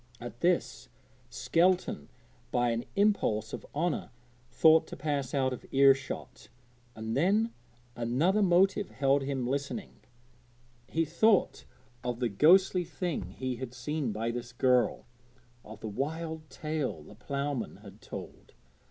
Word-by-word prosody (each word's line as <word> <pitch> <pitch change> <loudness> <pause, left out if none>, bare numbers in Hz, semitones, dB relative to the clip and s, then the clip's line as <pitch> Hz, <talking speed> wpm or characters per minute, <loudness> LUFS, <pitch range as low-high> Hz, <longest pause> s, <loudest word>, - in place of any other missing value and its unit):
At 120 0 -8
this 175 0 0 0.4
Skelton 180 +2 +1 0.4
by 120 -1 +2
an 115 +1 -2
impulse 195 - +1
of - - -7
honour 170 +2 -1 0.4
thought 160 +6 +5
to - - -8
pass 140 -2 -2
out 130 -2 +1
of 125 - -8
ear 135 0 +7
shot, 135 0 -8 0.5
and 110 +1 -4
then 205 - +2 0.4
another 140 - +1
motive 190 +2 +3
held 135 +1 +2
him 135 -2 -2
listening. 140 - -4 0.9
He 165 +3 0
thought 195 +6 +2 0.4
of 120 -1 -3
the 120 -2 0
ghostly 180 - +5
thing 170 0 -4
he 130 -2 -3
had 125 0 -7
seen 145 0 -2
by 115 +3 -2
this 120 +1 -6
girl, 125 0 +2 0.6
of 110 0 -11
the - - -5
wild 155 +6 -4
tale 150 - -3
the 90 - -13
ploughman 140 +3 -3
had - - -13
told. - - -9
140 Hz, 135 wpm, -30 LUFS, 120-170 Hz, 0.9 s, ear